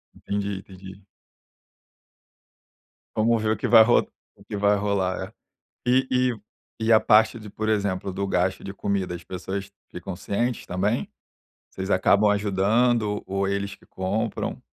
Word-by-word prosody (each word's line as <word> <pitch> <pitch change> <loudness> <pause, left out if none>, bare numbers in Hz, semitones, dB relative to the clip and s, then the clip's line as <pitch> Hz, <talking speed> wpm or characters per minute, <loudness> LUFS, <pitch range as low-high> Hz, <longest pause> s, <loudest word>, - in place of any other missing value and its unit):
Entendi, 100 -1 -3
entendi. 95 0 -12 2.1
Vamos 115 +1 +2
ver 110 - +1
o 110 - 0
que 125 - -2
vai 115 -1 +8
ro 120 +2 +3 0.3
o - - -19
que 105 - -6
vai 100 0 +3
rolar, 100 -2 -1 0.6
é. - - +3
E 130 +1 +3
e 125 -1 +2 0.4
e 115 0 +2
a 110 - +7
parte 110 +1 +4
de, 105 - -10
por 110 +2 -3
exemplo, 100 -3 -1
do 100 +2 -2
gasto 95 0 0
de 100 - -6
comida, 100 -3 -2
as 85 -1 -8
pessoas 95 +2 -5 0.2
ficam 90 +1 -6
cientes 115 +6 -2
também? 100 +6 -1 0.6
Vocês 95 +1 -5
acabam 100 +3 +4
ajudando 105 +2 +1
ou 95 +1 -1
eles 100 0 -2
que - - -22
compram? 100 +4 -3
100 Hz, 150 wpm, -25 LUFS, 95-110 Hz, 2.1 s, vai